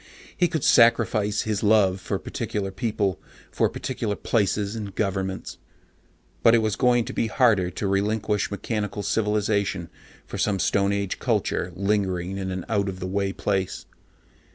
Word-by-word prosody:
He 175 - +3
could 160 -4 -2
sacrifice 110 -3 +4
his 105 -2 -1
love 100 -3 +3
for - - -2
particular 100 -2 -4
people, 105 -4 -1 0.3
for - - +1
particular 115 -5 -3
places 105 -1 0
and 100 -4 -6
governments 95 -2 -2 0.8
but 115 - +6
it 115 - +3
was 110 -2 0
going 120 -3 +3
to - - -6
be 115 - 0
harder 110 -7 +3
to 95 +3 -3
relinquish 105 +1 0
mechanical 105 -1 -3
civilization 105 -5 0 0.4
for - - -7
some 105 -2 +1
stone 100 +1 +1
age 100 -1 -2
culture 90 - 0
lingering 95 -1 -1
in 95 -1 -3
an 95 -1 -4
out 100 -3 0
of 95 -1 -6
the 90 - -4
way 100 +1 -1
place. 95 -1 -2
100 Hz, 155 wpm, -25 LUFS, 95-110 Hz, 0.8 s, but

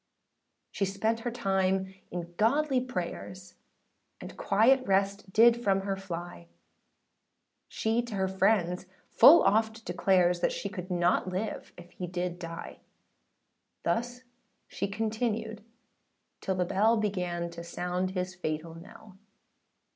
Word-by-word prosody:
â - - -52 0.7
She 200 - -1
spent 220 +4 -1
her 240 - -3
time 190 -4 0 0.2
in 175 -1 -6
godly 265 - +2
prayers, 185 -4 -6 0.7
And - - -9
quiet 240 +7 +3
rest 195 0 0
did 235 +3 +5
from 195 -2 +2
her 195 0 -2
fly; 175 - -7 1.2
She 225 +2 0
to 230 -3 -6
her 190 -1 0
friends 190 -2 +1 0.2
full 330 +4 +8
oft 220 +2 +1
declares, 180 0 +2
She 200 - -4
could 185 -2 -7
not 175 0 +1
live 190 +4 -4
if 175 0 -13
he 180 0 -6
did 175 0 -3
die: 165 -1 -8 1.0
Thus 245 +2 -2 0.4
she - - -3
continued 220 +1 -3 0.8
till 190 - -1
the 180 -1 0
bell, 220 +6 +3
Began 180 -5 -2
to 170 0 -8
sound 180 +2 -2
his 185 0 -3
fatal 160 -2 -4
knell. 190 +3 -14
195 Hz, 125 wpm, -29 LUFS, 180-220 Hz, 1.2 s, full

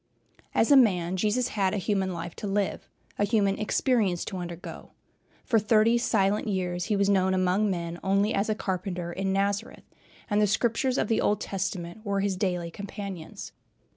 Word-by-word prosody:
As 225 - +3
a - - +9
man, 185 -8 +4
Jesus 215 +6 +1
had 195 -2 0
a - - 0
human 190 0 0
life 170 -1 -6
to 210 - -4
live, 200 0 -2 0.3
a - - +3
human 205 -2 +1
experience 215 -5 +1
to 190 - -5
undergo. 175 -1 -8 0.5
For 230 -3 +3
thirty 220 +2 +3
silent 200 -1 +1
years 180 -3 -1
he 210 - 0
was 200 0 +2
known 190 -1 +3
among 185 +3 +2
men 170 -2 -3
only 200 +3 +2
as 200 +2 0
a 215 - +1
carpenter 180 -3 -3
in 195 +1 -1
Nazareth, 200 +3 -1 0.4
and 210 -1 +2
the 210 - +4
Scriptures 235 +5 +1
of - - +1
the 225 - +1
Old 210 - +2
Testament 190 0 -4
were 200 -2 -1
his 195 -1 0
daily 180 -3 -2
companions. 195 -3 -7
195 Hz, 175 wpm, -27 LUFS, 185-210 Hz, 0.5 s, a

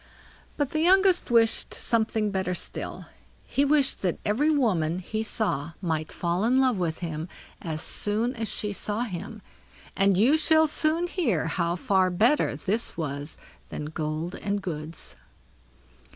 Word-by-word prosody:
But 290 -2 -1
the 310 - -1
youngest 375 +2 +4
wished 230 -2 +3
something 220 -2 +1
better 190 -2 -1
still. - - -4 0.4
He 275 - +1
wished 285 -1 +2
that 180 -3 0
every 245 +9 +2
woman 185 - +1
he 215 +4 -3
saw 200 -8 -1
might 160 -4 -2
fall 175 +2 -1
in 250 +4 +3
love 255 -5 +3
with 165 -3 -1
him 160 0 -4 0.3
as 160 -1 -3
soon 215 +8 -1
as 225 -1 -3
she 210 0 -3
saw 210 +2 -2
him; 210 0 -5 0.5
and 195 -1 +3
you 255 +10 +5
shall 315 0 +4
soon 315 +2 +1
hear 285 - 0
how 170 +1 0
far 190 -4 +2
better 225 +11 +2
this 220 +5 -1
was 145 -1 -4 0.3
than 150 - -5
gold 155 +3 -3
and 200 0 -2
goods. 155 - -5
205 Hz, 150 wpm, -26 LUFS, 170-255 Hz, 0.5 s, you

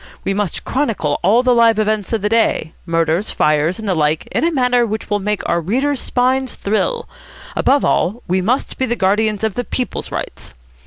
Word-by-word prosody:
We 195 - 0
must 205 -2 -3
chronicle 225 - -1
all 215 +7 +4
the 255 -1 +4
live 230 -2 +4
events 215 -2 0
of 225 -3 -1
the - - +2
day, 225 -7 +1
murders, 165 +3 0
fires, 155 +4 +1
and 220 -2 -6
the 190 - +2
like 155 -1 +1
in - - 0
a 335 - +2
manner 250 -4 +2
which 220 -1 -4
will 205 - +2
make 210 +1 -2
our 170 0 +1
readers' 265 - 0
spines 260 +1 0
thrill. 465 - -1 0.5
Above 280 +1 +2
all, 215 +7 0
we 185 +1 +1
must 240 +8 -1
be 260 - +1
the 240 - 0
guardians 210 +1 +1
of 220 -2 0
the 245 - -2
People's 250 +1 -3
rights. - - -6
215 Hz, 200 wpm, -18 LUFS, 185-245 Hz, 0.5 s, all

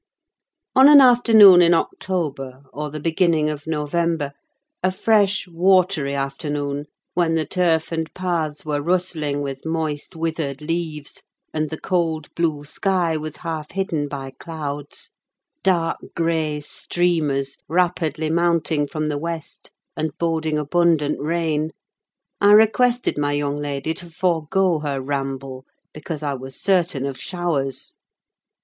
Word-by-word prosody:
On 265 +2 +8
an 295 -1 +10
afternoon 225 -7 +8
in 170 0 +5
October, 145 -7 -3
or 150 +1 -4
the 155 +1 -6
beginning 160 -1 +1
of 150 0 -8
November—a 165 - -3
fresh 205 0 +2
watery 175 -5 +2
afternoon, 145 +1 -3 0.3
when 170 -2 +1
the 160 -1 0
turf 170 -4 +1
and 160 -1 -3
paths 165 -5 -2
were 145 -1 -1
rustling 155 -4 -1
with 135 -1 -5
moist, 160 -2 -3
withered 160 -4 -3
leaves, 155 -2 -4 0.3
and 155 -1 -1
the 160 - -6
cold 165 -4 -1
blue 160 -4 -1
sky 180 0 0
was 155 0 -4
half 155 -2 -4
hidden 170 -6 -2
by 135 -2 -6
clouds—dark 165 - -4 0.2
grey 160 -3 0
streamers, 150 -3 -1
rapidly 160 -3 0
mounting 165 -3 +1
from 155 +1 -3
the 150 -1 -2
west, 165 0 -6 0.3
and 155 -1 -3
boding 160 -2 0
abundant 150 -1 +1
rain—I 160 +5 -1
requested 235 -1 +4
my 145 0 0
young 145 0 -1
lady 145 +1 -3
to 175 +1 -8
forego 170 +1 +1
her 145 -2 -2
ramble, 135 -1 -4 0.3
because 155 0 -6
I 145 -1 -1
was 130 0 -8
certain 175 -8 +1
of 135 -2 -5
showers. 145 -7 -3
160 Hz, 125 wpm, -22 LUFS, 145-175 Hz, 0.3 s, an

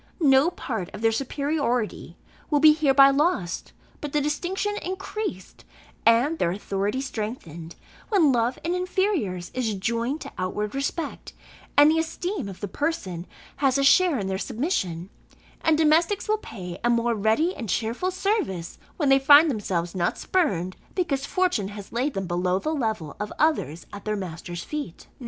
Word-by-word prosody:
No 280 0 +5
part 220 - -5
of - - -8
their 225 0 +3
superiority 275 -2 -2 0.3
will 295 - +3
be 310 +1 +8
hereby 275 -3 +6
lost, 275 - 0 0.3
but 295 -2 -5
the 300 - +3
distinction 370 +8 -1
increased, 380 - -5 0.4
and 250 +8 +4
their 170 - +2
authority 200 +5 -2
strengthened, 210 - -6 0.3
when 360 -10 +4
love 240 0 +1
in 340 +2 0
inferiors 360 - -1
is 230 -5 -1
joined 235 +8 -1
to - - -7
outward 205 +3 -2
respect, 280 +3 -4 0.4
and 290 +1 +8
the 325 - +2
esteem 330 - -3
of 190 - -10
the 205 - -2
person 190 - -3 0.3
has 270 -2 +2
a 275 - +2
share 325 +2 +5
in 200 - -2
their 190 0 -2
submission: 195 - -2 0.5
and 320 -1 +4
domestics 325 +7 +3
will 430 0 +1
pay 180 - -8
a 240 - +2
more 235 0 +2
ready 225 - +1
and 225 - -6
cheerful 230 - -1
service, 370 - -2 0.2
when 295 -5 +1
they 270 0 +6
find 290 +3 +7
themselves 180 -7 -2
not 175 -2 0
spurned, 190 - 0 0.2
because 280 -7 -1
fortune 360 - +1
has 205 -1 -9
laid 260 +5 -1
them 195 0 -2
below 180 +1 0
the 310 +11 -2
level 220 - -2
of 210 0 -4
others 175 - 0
at 200 - -9
their 215 0 0
master's 175 -1 -6
feet." 295 - -6
255 Hz, 160 wpm, -25 LUFS, 195-315 Hz, 0.5 s, be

